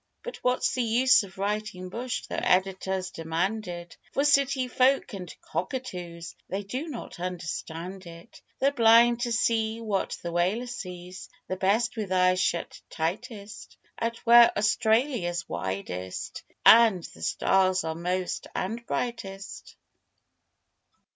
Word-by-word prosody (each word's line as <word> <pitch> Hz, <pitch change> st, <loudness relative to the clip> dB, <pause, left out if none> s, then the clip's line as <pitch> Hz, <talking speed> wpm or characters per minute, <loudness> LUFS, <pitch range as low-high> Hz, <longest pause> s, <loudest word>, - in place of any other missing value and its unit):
But -, -, -6 dB
what's 250 Hz, 0 st, +1 dB
the 255 Hz, -, 0 dB
use 240 Hz, +2 st, +4 dB
of 195 Hz, -2 st, -11 dB
writing 200 Hz, -2 st, -3 dB
'bush' 240 Hz, +5 st, -4 dB
Though -, -, -3 dB
editors 190 Hz, 0 st, 0 dB
demand 175 Hz, +6 st, -2 dB
it 175 Hz, -1 st, -8 dB, 0.2 s
For 280 Hz, -, +1 dB
city 275 Hz, -2 st, +3 dB
folk 260 Hz, +1 st, +2 dB
and 180 Hz, -4 st, -6 dB
cockatoos, 175 Hz, -7 st, -5 dB, 0.2 s
They 195 Hz, +2 st, -3 dB
do 255 Hz, +11 st, -4 dB
not 250 Hz, -, -8 dB
understand 180 Hz, +1 st, -5 dB
it. 170 Hz, 0 st, -13 dB, 0.2 s
They're 275 Hz, +1 st, +2 dB
blind 235 Hz, -2 st, +5 dB
to 225 Hz, -1 st, +1 dB
what 205 Hz, -3 st, -1 dB
the 170 Hz, -, -3 dB
whaler 185 Hz, +8 st, +1 dB
sees 180 Hz, -6 st, -8 dB, 0.2 s
The 185 Hz, -, -2 dB
best 220 Hz, +6 st, +1 dB
with 205 Hz, -4 st, -3 dB
eyes 185 Hz, 0 st, +3 dB
shut 170 Hz, -2 st, -2 dB
tightest, 205 Hz, +5 st, -5 dB, 0.2 s
Out 230 Hz, 0 st, -1 dB
where 235 Hz, 0 st, +8 dB
Australia's 220 Hz, -4 st, +1 dB
widest, 95 Hz, -1 st, -5 dB, 0.2 s
and 220 Hz, -6 st, +7 dB
The 80 Hz, -, -11 dB
stars 185 Hz, -, +2 dB
are 160 Hz, 0 st, -2 dB
most 180 Hz, +2 st, -2 dB
and 225 Hz, +5 st, -3 dB
brightest. 205 Hz, -5 st, -5 dB
195 Hz, 130 wpm, -27 LUFS, 180-235 Hz, 0.2 s, where